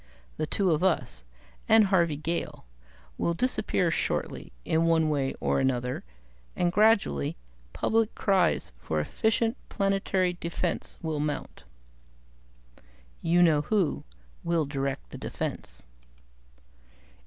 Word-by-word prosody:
The 155 - -1
two 190 +1 +1
of 155 +2 +1
us, 180 - 0 0.5
and 220 -1 +7
Harvey 170 -5 +2
Gale, 165 - -3 0.5
will 170 - +1
disappear 195 -6 +1
shortly - - -2
in 160 +1 +2
one 160 -1 +3
way 135 -2 0
or - - +1
another, 125 -1 -1 0.5
and 175 - +1
gradually 200 - +3 0.3
public 225 - +1
cries 185 - +1
for 80 +4 -2
effective 225 - +1 0.2
planetary 195 -2 +1
defense 170 0 -3
will 160 -2 -2
mount. 145 - -4 1.6
"You 175 +2 +4
know 155 -4 +4
who 190 0 0 0.4
will 170 -2 +1
direct 135 - -3
the - - -8
defense." - - -5
170 Hz, 110 wpm, -28 LUFS, 145-195 Hz, 1.6 s, and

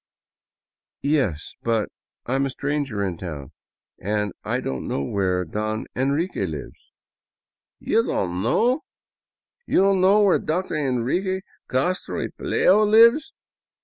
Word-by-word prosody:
" - - -70 0.2
Yes, 85 - -2
but 115 -2 0 0.4
I 125 - -2
am 135 +1 +1
a - - -4
stranger 140 -6 -2
in 90 -4 -4
town 75 -7 -7 0.5
and 105 0 -1
I - - -1
don't 65 -1 -4
know 70 - -1
where 90 +2 0
Don 110 +5 -3
Enrique 140 - 0
lives." 75 -4 -9 0.4
*' - - -70
You 225 - +5
don't 90 - -2
know? 240 - +2 0.9
You - - +3
don't 195 -1 +3
know 200 +3 +5
where 195 -3 +4
Dr. 180 +4 -2
Enrique 155 +7 0 0.3
Castro 180 +8 -1
y - - -2
Pelayo 205 +3 +3
lives! 230 +8 +5
130 Hz, 135 wpm, -23 LUFS, -, 0.9 s, You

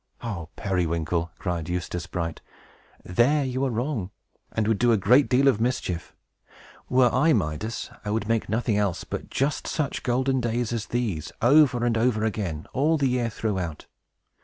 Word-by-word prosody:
"O 90 -9 -4
Periwinkle!" 85 -3 -1
cried 90 -3 -3
Eustace 90 0 -3
Bright, 85 -3 -4 0.6
"there 135 +10 +3
you 130 +1 -2
are - - +1
wrong, 120 -4 -2 0.4
and 110 -1 0
would 110 -2 +1
do 120 -1 +4
a 115 - +4
great 125 +6 +4
deal 135 +2 +4
of 110 -5 +3
mischief. 105 -8 -2 0.7
Were 125 -1 +4
I 150 +5 +4
Midas, 95 +3 -2
I 105 - -4
would 105 0 -1
make 115 -1 0
nothing 110 0 +1
else 100 -4 0
but - - -6
just 140 +2 -1
such 150 -4 -2
golden 130 +1 +1
days 120 0 -1
as 115 -1 -3
these 105 -11 -2
over 125 -1 +5
and 115 -2 +1
over 110 -2 +2
again, 95 -8 -3
all 155 +5 +2
the 140 -3 +2
year 125 -2 0
throughout. 95 -8 -3
115 Hz, 165 wpm, -25 LUFS, 90-125 Hz, 0.7 s, over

